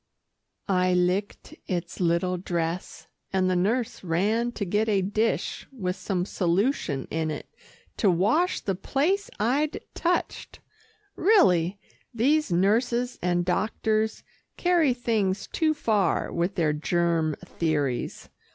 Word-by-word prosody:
I 185 -1 +2
licked 180 +3 -1
its 175 -2 -3
little 175 +1 +1
dress, 170 -1 -3 0.3
and 190 -1 +2
the 185 - +1
nurse 220 +7 0
ran 210 +8 +1
to 205 - -3
get 210 +4 +1
a 195 -3 +2
dish 215 +4 -1
with 185 -8 -3
some 185 -1 -2
solution 180 - 0
in 160 0 -1
it 150 - -5 0.5
to 205 - +3
wash 215 - +2
the 195 - -1
place 320 - 0
I'd 275 +8 +1
touched. 350 0 -2 0.6
Really, 195 - +4 0.4
these 285 +2 +2
nurses 235 +7 +1
and 175 0 +1
doctors 215 +3 0 0.3
carry 340 -8 +3
things 215 -6 0
too 310 -2 0
far 210 - +1
with 175 +3 -1
their 155 -4 +2
germ 165 0 0
theories. 150 -8 -2
195 Hz, 120 wpm, -26 LUFS, 175-235 Hz, 0.6 s, Really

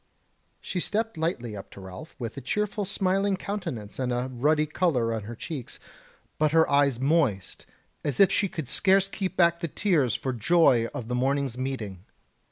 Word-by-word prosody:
She 180 - -4
stepped 220 +4 -1
lightly 155 - -2
up 100 - -9
to - - -11
Ralph 95 - -10
with 120 -5 -5
a 135 - -6
cheerful 210 - -1
smiling 195 0 +1
countenance 155 - -5
and 125 -1 -1
a 125 +2 -2
ruddy 150 +5 +2
colour 145 -8 +1
in 110 -3 -4
her 120 +2 -7
cheeks, 135 0 -6 0.6
but 155 0 +2
her 160 0 +5
eyes 140 -3 +3
moist 135 - 0 0.4
as 145 -4 -2
if 195 - +7
she 200 - +2
could 160 -7 -5
scarce 195 +6 +3
keep 190 -1 -4
back 170 -1 +4
the 170 - -2
tears 155 - +1
for 130 - -2
joy 120 -1 +4
of 115 - -6
the 125 - -3
morning's 135 0 0
meeting. 120 -8 -4
145 Hz, 175 wpm, -27 LUFS, 120-180 Hz, 0.6 s, if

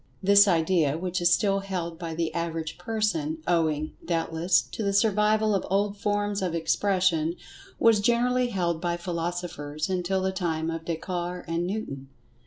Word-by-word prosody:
This 200 +1 +7
idea, 165 -4 +2
which 180 +1 -2
is 175 0 +4
still 195 +2 +3
held 180 -4 -4
by 165 -2 -5
the 165 0 -2
average 165 -1 -3
person, 175 -7 -1
owing, 155 -3 +1
doubtless, 165 +1 +1
to - - -7
the 200 -1 0
survival 215 +1 +3
of 195 - 0
old 200 +2 +1
forms 205 0 -1
of 180 -3 -1
expression, 170 -1 +1 0.4
was 225 -2 +5
generally[Pg 205 - +2 0.4
111] - - -8
held 170 -3 0
by 175 -1 -1
philosophers 170 -3 -4
until 185 +1 0
the 190 - +1
time 165 -4 -2
of 165 0 -5
Descartes 175 +1 -4
and 165 +1 -1
Newton. 140 -10 -5
175 Hz, 160 wpm, -26 LUFS, 165-195 Hz, 0.4 s, This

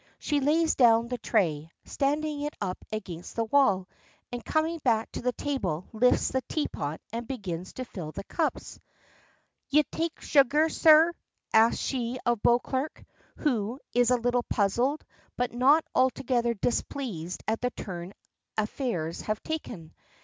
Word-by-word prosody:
She 295 -1 0
lays 315 +4 +3
down 235 -2 +4
the 250 -1 -3
tray, 160 -8 0 0.2
standing 295 +1 -1
it 295 +1 -3
up 185 -2 -4
against 185 -6 -6
the 230 - +1
wall, 210 -7 +3 0.4
and 245 -1 -5
coming 320 +1 0
back 225 -6 +1
to - - -5
the 250 - +1
table 195 - -2
lifts 250 +3 +3
the 260 - 0
teapot 155 - -2
and 235 0 -4
begins 185 -8 -5
to 255 - -5
fill 170 -9 -7
the - - -6
cups. 320 - -3 0.9
"Ye 300 +2 +5
take 330 +2 -4
sugar, 295 +3 +3
sir?" 320 +1 +6 0.4
asks 220 +1 +5
she 250 -2 -2
of 240 -3 +1
Beauclerk, 260 +4 0 0.3
who 240 -4 -1
is 245 0 +4
a 250 - +4
little 245 +1 +1
puzzled, 240 +8 0 0.3
but 245 -1 -1
not 275 +6 +4
altogether 250 -2 +1
displeased 205 - -3
at 220 +1 0
the 250 - +1
turn 180 -5 -7 0.4
affairs 210 - -2
have 215 0 -3
taken. 235 - -6
245 Hz, 145 wpm, -28 LUFS, 205-280 Hz, 0.9 s, sir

